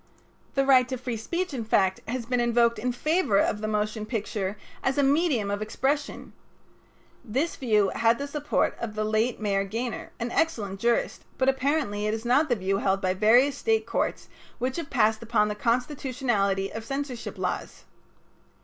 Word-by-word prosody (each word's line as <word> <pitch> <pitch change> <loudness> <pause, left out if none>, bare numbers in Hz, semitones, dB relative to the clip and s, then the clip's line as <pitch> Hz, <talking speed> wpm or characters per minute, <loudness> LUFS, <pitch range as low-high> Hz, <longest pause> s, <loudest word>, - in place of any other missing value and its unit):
The 275 -1 +2
right 255 -2 +5
to 260 - -2
free 250 -1 -4
speech, 340 +10 -3
in 245 -4 -3
fact, 190 -3 +2
has 240 0 -3
been 250 +1 0
invoked 235 -1 +3
in 250 +3 -1
favor 305 - +1
of 210 +1 +1
the 215 - -2
motion 215 0 -2
picture 205 -3 -3 0.2
as 265 +1 0
a 285 - +4
medium 275 - +2
of 205 +1 -2
expression. 275 +7 -2 0.9
This 265 +8 -1
view 215 -6 +2
had 230 0 +3
the 280 - -3
support 295 0 0
of 220 -2 -5
the 215 - -1
late 220 +3 0
Mayor 200 -2 +1
Gaynor, 225 +4 -4
an 235 +1 -3
excellent 210 -13 -1
jurist, 235 +2 0
but 260 0 +3
apparently 265 -6 0
it 215 - 0
is 225 +1 -7
not 275 +6 +3
the 245 - +3
view 195 -1 -1
held 195 -1 +1
by 185 -1 0
various 240 +8 +4
State 445 -1 +1
courts - - -2 0.3
which 255 +4 -2
have 335 -4 -4
passed 220 -4 +2
upon 225 -2 +1
the - - -1
constitutionality 235 -5 0
of 225 - -5
censorship 275 0 -5
laws. - - -4
235 Hz, 175 wpm, -26 LUFS, 210-270 Hz, 0.9 s, right